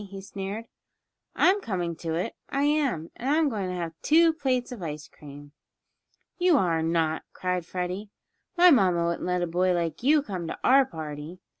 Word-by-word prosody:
he 195 Hz, 0 st, -8 dB
sneered. 195 Hz, +3 st, -6 dB, 0.7 s
"I'm 395 Hz, +3 st, +4 dB
coming 175 Hz, -, -3 dB
to 165 Hz, -1 st, -3 dB
it, 175 Hz, -, -2 dB, 0.2 s
I 275 Hz, +1 st, 0 dB
am; 285 Hz, -, 0 dB
and 255 Hz, -, -4 dB
I'm 305 Hz, 0 st, +3 dB
going 200 Hz, -6 st, -3 dB
to 180 Hz, -, -3 dB
have 170 Hz, -2 st, -4 dB
two 325 Hz, +1 st, +5 dB
plates 260 Hz, -5 st, -1 dB
of 240 Hz, -6 st, -7 dB
ice 150 Hz, -2 st, -6 dB
cream." 145 Hz, 0 st, -13 dB, 0.9 s
"You 355 Hz, -3 st, +4 dB
are 170 Hz, -7 st, +1 dB
not!" 160 Hz, -1 st, 0 dB
cried 180 Hz, -2 st, -2 dB
Freddie. 185 Hz, +3 st, -4 dB, 0.5 s
"My 355 Hz, 0 st, +8 dB
mamma 185 Hz, -, +3 dB
wouldn't 170 Hz, +1 st, -2 dB
let 180 Hz, 0 st, 0 dB
a -, -, +2 dB
boy 180 Hz, +2 st, +1 dB
like 170 Hz, +1 st, -2 dB
you 290 Hz, +3 st, +4 dB
come 185 Hz, -, -5 dB
to -, -, -5 dB
our 265 Hz, +1 st, +5 dB
party." 155 Hz, +1 st, -7 dB
185 Hz, 180 wpm, -26 LUFS, 165-265 Hz, 0.9 s, My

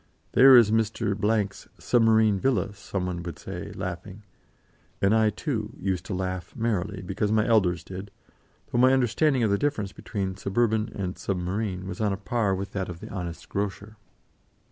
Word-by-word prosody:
"There 130 Hz, 0 st, +8 dB
is 115 Hz, -3 st, +6 dB
Mr. 110 Hz, -1 st, +1 dB, 0.4 s
's -, -, -14 dB
submarine 110 Hz, -4 st, +3 dB
villa," 130 Hz, -3 st, 0 dB
some 95 Hz, -2 st, -4 dB
one 90 Hz, -1 st, -3 dB
would 85 Hz, -1 st, -6 dB
say, -, -, -7 dB
laughing: 95 Hz, +2 st, -6 dB, 0.8 s
and 100 Hz, +2 st, +3 dB
I, 110 Hz, -1 st, +4 dB
too, 110 Hz, -1 st, -4 dB
used 95 Hz, -2 st, -2 dB
to 100 Hz, -, -3 dB
laugh 90 Hz, -1 st, -4 dB
merrily, 100 Hz, -4 st, -2 dB
because 100 Hz, +3 st, -1 dB
my 110 Hz, 0 st, +3 dB
elders 90 Hz, -7 st, +2 dB
did, 95 Hz, +3 st, -8 dB, 0.6 s
though 120 Hz, -, +1 dB
my 130 Hz, +1 st, +6 dB
understanding 130 Hz, +1 st, +2 dB
of 110 Hz, -, +2 dB
the 100 Hz, -, +2 dB
difference 125 Hz, -10 st, -1 dB
between 95 Hz, -2 st, -4 dB
suburban 110 Hz, +2 st, +1 dB
and 95 Hz, -2 st, -4 dB
submarine 95 Hz, 0 st, -2 dB
was 95 Hz, +2 st, -5 dB
on 105 Hz, -2 st, +1 dB
a -, -, -3 dB
par 105 Hz, -1 st, 0 dB
with 95 Hz, +2 st, -5 dB
that 95 Hz, -2 st, -3 dB
of 85 Hz, -2 st, -7 dB
the -, -, -9 dB
honest 90 Hz, -4 st, -6 dB
grocer. 100 Hz, +1 st, -4 dB
100 Hz, 170 wpm, -26 LUFS, 95-110 Hz, 0.8 s, There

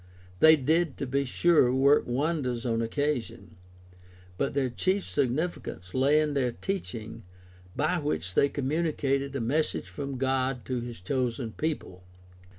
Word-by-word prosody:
They 160 Hz, 0 st, +8 dB
did, 155 Hz, +2 st, +1 dB
to -, -, -3 dB
be 140 Hz, +2 st, 0 dB
sure, 150 Hz, -1 st, +3 dB
work 140 Hz, +2 st, +4 dB
wonders 125 Hz, -2 st, -1 dB
on 115 Hz, -1 st, 0 dB
occasion, 115 Hz, -, -2 dB, 0.8 s
but 90 Hz, -, -2 dB
their 135 Hz, -3 st, +1 dB
chief 190 Hz, +9 st, 0 dB
significance 130 Hz, -, -2 dB
lay 140 Hz, +4 st, +4 dB
in 150 Hz, -1 st, 0 dB
their 130 Hz, -3 st, +1 dB
teaching, 115 Hz, -, -5 dB, 0.5 s
by 155 Hz, +4 st, +1 dB
which 90 Hz, -, -2 dB
they 140 Hz, -, +4 dB
communicated 140 Hz, -1 st, -1 dB
a -, -, -1 dB
message 145 Hz, +7 st, -1 dB
from 140 Hz, -2 st, -5 dB
God 130 Hz, -1 st, 0 dB
to 130 Hz, -1 st, -2 dB
his 120 Hz, -5 st, -8 dB
chosen 120 Hz, +2 st, -2 dB
people. 145 Hz, -, -4 dB
135 Hz, 140 wpm, -28 LUFS, 120-150 Hz, 0.8 s, They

